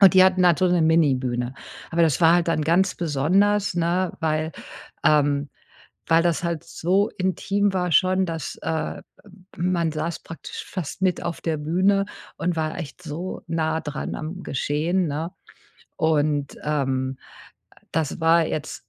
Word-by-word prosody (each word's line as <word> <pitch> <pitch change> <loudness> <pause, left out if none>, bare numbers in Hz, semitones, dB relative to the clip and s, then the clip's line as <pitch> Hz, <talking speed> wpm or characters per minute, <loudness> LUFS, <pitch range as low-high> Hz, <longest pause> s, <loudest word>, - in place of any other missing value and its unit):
und 195 -2 +8
die 185 - +8
hatten 185 -1 +4
halt 170 -3 +4
so 185 - +4
'ne 175 -2 +3
Mini-Bühne. 130 -6 +2 0.4
Aber 170 +1 +2
das 160 0 +2
war 165 +1 +6
halt 175 -1 +2
dann 155 -2 +1
ganz 175 +5 +2
besonders, 185 +6 +2
ne, 175 +2 0
weil, 155 0 0 0.5
ähm, 145 -1 +3 0.6
weil 165 +1 +4
das 175 0 +1
halt 170 -3 -2
so 190 +5 +1
intim 195 +2 0
war 180 -2 0
schon, 185 +3 +4
dass, 165 -4 -5
äh, 160 -1 -3 0.6
man 170 -2 0
saß 160 +2 -3
praktisch 165 - -8
fast 185 -1 -6
mit 185 -2 +1
auf 170 - -3
der 165 -2 -1
Bühne 185 +6 +2 0.3
und 175 0 -1
war 155 -1 -2
echt 170 +1 -7
so 170 +4 -5
nah 160 -1 0
dran 150 -2 -4
am 165 +4 -6
Geschehen, 160 +6 0
ne? 155 +4 -3 0.7
Und, 150 -2 +1
ähm, 135 -3 -1 0.8
das 160 0 -1
war 165 0 +4
jetzt 155 -1 -5
165 Hz, 155 wpm, -24 LUFS, 150-180 Hz, 0.8 s, und